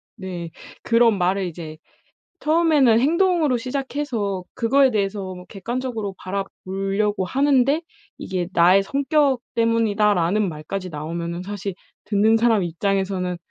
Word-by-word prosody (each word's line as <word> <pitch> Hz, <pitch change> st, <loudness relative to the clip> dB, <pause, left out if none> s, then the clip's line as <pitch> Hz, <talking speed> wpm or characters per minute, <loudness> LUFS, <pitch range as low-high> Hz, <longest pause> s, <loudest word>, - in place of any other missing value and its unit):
네. 175 Hz, -3 st, -6 dB, 0.3 s
그런 230 Hz, -3 st, +4 dB
말을 185 Hz, +2 st, +1 dB
이제 160 Hz, -2 st, -8 dB, 0.6 s
처음에는 305 Hz, -7 st, +4 dB
행동으로 325 Hz, -2 st, +2 dB
시작해서 255 Hz, -6 st, -3 dB
그거에 265 Hz, +3 st, +3 dB
대해서 195 Hz, -2 st, -2 dB
뭐 180 Hz, 0 st, -11 dB
객관적으로 225 Hz, -1 st, -4 dB
바라보려고 195 Hz, +1 st, -2 dB
하는데 275 Hz, -, +2 dB, 0.4 s
이게 180 Hz, -2 st, -3 dB
"나의 185 Hz, +3 st, +5 dB
성격 280 Hz, +2 st, +1 dB, 0.2 s
때문이다."라는 210 Hz, -4 st, +2 dB
말까지 180 Hz, +5 st, -6 dB
나오면은 170 Hz, +3 st, -5 dB
사실 200 Hz, -1 st, -5 dB, 0.3 s
듣는 215 Hz, +2 st, +3 dB
사람 225 Hz, -4 st, +3 dB
입장에서는 185 Hz, +1 st, -1 dB
205 Hz, 305 characters per minute, -22 LUFS, 185-250 Hz, 0.6 s, 나의